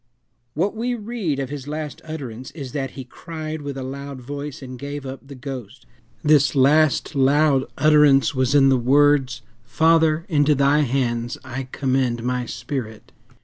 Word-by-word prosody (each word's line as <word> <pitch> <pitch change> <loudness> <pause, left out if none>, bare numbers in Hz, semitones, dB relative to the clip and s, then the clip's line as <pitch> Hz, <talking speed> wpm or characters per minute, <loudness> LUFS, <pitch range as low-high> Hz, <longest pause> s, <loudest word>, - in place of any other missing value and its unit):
What 190 +8 0
we 245 +2 -1
read 210 - -3
of 135 -1 -4
his 145 -2 -6
last 150 -1 -5
utterance 130 -6 -7
is 135 -5 -7
that 135 -2 -3
"he 135 - -5
cried 155 +4 -7
with 140 -1 -6
a 135 - -4
loud 140 +1 -7
voice, 140 +2 -7
and 130 -1 -8
gave 145 0 -6
up 130 0 -6
the 140 - -10
ghost." 130 -3 -8 0.4
This 150 -2 +4
last 150 +3 +3
loud 140 0 +3
utterance 150 -2 +5
was 130 +1 +1
in 135 -1 +6
the 130 -2 +3
words, 140 +1 +3 0.2
"Father, 160 +4 +2
into 150 -3 +3
thy 140 +2 +3
hands 120 -4 -1
I 130 0 -6
commend 130 -3 0
my 125 0 -2
spirit." 110 -7 -6
140 Hz, 160 wpm, -22 LUFS, 130-150 Hz, 0.4 s, in